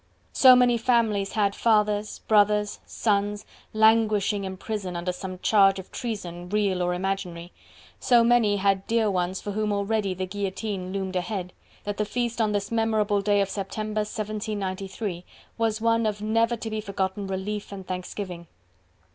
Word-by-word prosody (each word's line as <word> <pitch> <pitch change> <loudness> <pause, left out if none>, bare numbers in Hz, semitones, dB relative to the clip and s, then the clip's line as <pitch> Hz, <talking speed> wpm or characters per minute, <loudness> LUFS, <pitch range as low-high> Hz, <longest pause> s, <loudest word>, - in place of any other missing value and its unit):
So 255 -1 +8
many 245 -1 +4
families 225 -5 +1
had 200 -2 +1
fathers, 210 -2 +1
brothers, 210 -1 +3
sons, 205 -1 0 0.3
languishing 215 -2 +3
in 190 0 -5
prison 200 -3 -4
under 175 +1 -2
some 185 +1 -7
charge 195 -2 +5
of 190 - -9
treason, 180 -7 -5
real 200 -3 +1
or 180 0 0
imaginary; 180 -2 -4 0.5
so 240 -2 +4
many 230 -3 +3
had 195 -1 +1
dear 225 -2 +2
ones 180 0 -1
for 205 - -4
whom 210 +1 -1
already 200 -1 0
the 185 +1 -3
guillotine 195 0 -4
loomed 190 -1 -3
ahead, 180 0 -3 0.3
that 205 -1 -4
the 215 - 0
feast 240 +1 -2
on 215 -1 +2
this 205 0 -2
memorable 220 -2 +1
day 205 0 +2
of 195 - 0
September, 215 +2 -3
1793, 205 -3 -4 0.4
was 225 -1 +1
one 230 0 +2
of 210 -1 -2
never 230 +2 +1
to 225 -1 -6
be 215 0 -2
forgotten 195 -1 -3
relief 200 +2 -4
and 190 -2 -8
thanksgiving. 180 -1 -5
205 Hz, 155 wpm, -26 LUFS, 190-220 Hz, 0.5 s, So